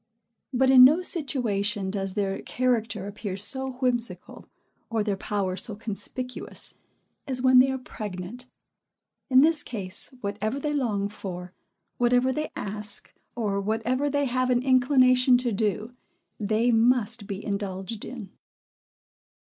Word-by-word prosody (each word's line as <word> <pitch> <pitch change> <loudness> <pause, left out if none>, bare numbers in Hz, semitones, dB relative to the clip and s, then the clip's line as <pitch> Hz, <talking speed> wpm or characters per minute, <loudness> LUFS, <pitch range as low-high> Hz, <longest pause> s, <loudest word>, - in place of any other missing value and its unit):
But, 260 0 +3
in 255 -1 +10
no 310 +8 +6
situation 210 - -1
does 195 -1 -3
their 195 -2 -1
character 230 -5 -1
appear 200 -1 -5
so 265 +6 0
whimsical, 250 -2 -2 0.4
or 225 -2 0
their 205 -2 -1
power 195 -1 -2
so 200 +3 -1
conspicuous, 230 +4 -5 0.5
as 255 -2 -1
when 255 -1 +7
they 260 +1 +5
are 265 - -1
pregnant. 215 0 -7 0.8
In 260 0 +7
this 315 0 +4
case, 200 -8 -4
whatever 210 +5 -2
they 295 +1 -2
long 215 -8 0
for, 180 -3 -7 0.5
whatever 245 +2 +3
they 305 +2 -3
ask, 210 0 -4 0.2
or 205 -4 -1
whatever 230 +7 0
they 285 0 +1
have 255 0 0
an 245 0 +2
inclination 255 -1 +5
to 245 -1 -1
do, 215 +2 -1 0.5
they 220 +3 +2
must 230 -2 +2
be 200 +1 -5
indulged 200 +1 -4
in. 230 -6 -8
230 Hz, 130 wpm, -26 LUFS, 205-255 Hz, 0.8 s, in